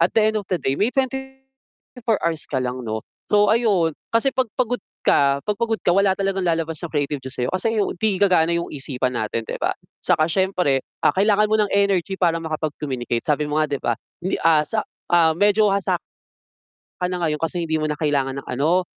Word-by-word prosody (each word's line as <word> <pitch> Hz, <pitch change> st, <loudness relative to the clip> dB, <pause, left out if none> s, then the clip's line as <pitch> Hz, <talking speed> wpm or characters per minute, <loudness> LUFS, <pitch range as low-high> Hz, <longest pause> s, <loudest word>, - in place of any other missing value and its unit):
at -, -, +5 dB
the 220 Hz, 0 st, +4 dB
end -, -, -2 dB
of 195 Hz, -, -15 dB
the 185 Hz, -, +1 dB
day 135 Hz, -, -1 dB
may 210 Hz, -, +3 dB
24 265 Hz, -3 st, -4 dB
hours 165 Hz, -2 st, 0 dB
ka 135 Hz, -, -2 dB
lang 125 Hz, 0 st, -3 dB
'no. 110 Hz, 0 st, -3 dB, 0.3 s
So 205 Hz, 0 st, +4 dB
ayun, 200 Hz, -8 st, +2 dB, 0.2 s
kasi 255 Hz, +3 st, +3 dB
'pag 255 Hz, -3 st, +1 dB
pagod 245 Hz, -2 st, 0 dB, 0.2 s
ka 140 Hz, 0 st, +4 dB
'pag 210 Hz, -1 st, -2 dB
pagod 225 Hz, -1 st, 0 dB
ka 175 Hz, -, +3 dB
wala 195 Hz, 0 st, +3 dB
talagang 195 Hz, -1 st, 0 dB
lalabas 165 Hz, -2 st, 0 dB
na 170 Hz, -, -3 dB
creativity 145 Hz, -2 st, -2 dB
sa'yo 125 Hz, -1 st, -2 dB
kasi 205 Hz, +5 st, +1 dB, 0.3 s
'di 205 Hz, -4 st, +2 dB
gagana 180 Hz, -4 st, +4 dB
'yung 170 Hz, -, -2 dB
isipan 130 Hz, -3 st, -2 dB
natin 110 Hz, +1 st, -2 dB
'di -, -, -5 dB
ba. -, -, +1 dB, 0.3 s
Saka 155 Hz, -, +3 dB
siyempre, 180 Hz, -6 st, +1 dB, 0.3 s
ah, -, -, +5 dB
kailangan 205 Hz, +2 st, +3 dB
mo 215 Hz, -, +3 dB
ng 205 Hz, -, +1 dB
energy 195 Hz, -2 st, +1 dB
para 170 Hz, -3 st, +3 dB
makapag-communicate, 145 Hz, -6 st, -3 dB
sabi 150 Hz, 0 st, +1 dB
mo 155 Hz, +1 st, +1 dB
nga 155 Hz, -, +1 dB
'di 140 Hz, -, -1 dB
ba? 120 Hz, -, +1 dB, 0.3 s
Hindi, 185 Hz, -, -1 dB
ah, 155 Hz, -2 st, +4 dB
sa, 215 Hz, -1 st, -1 dB, 0.3 s
ah, 165 Hz, -2 st, +5 dB
medyo 210 Hz, +1 st, +4 dB
hasa 200 Hz, -1 st, 0 dB, 1.0 s
ka 180 Hz, -, 0 dB
na 180 Hz, -, -3 dB
ngayon 150 Hz, -2 st, 0 dB
kasi 170 Hz, +1 st, -1 dB
hindi 160 Hz, -1 st, 0 dB
mo 155 Hz, -, -1 dB
na 150 Hz, -, -2 dB
kailangan 140 Hz, -3 st, 0 dB
ng -, -, -24 dB
ano, 160 Hz, +8 st, +2 dB
175 Hz, 205 wpm, -22 LUFS, 150-205 Hz, 1.0 s, at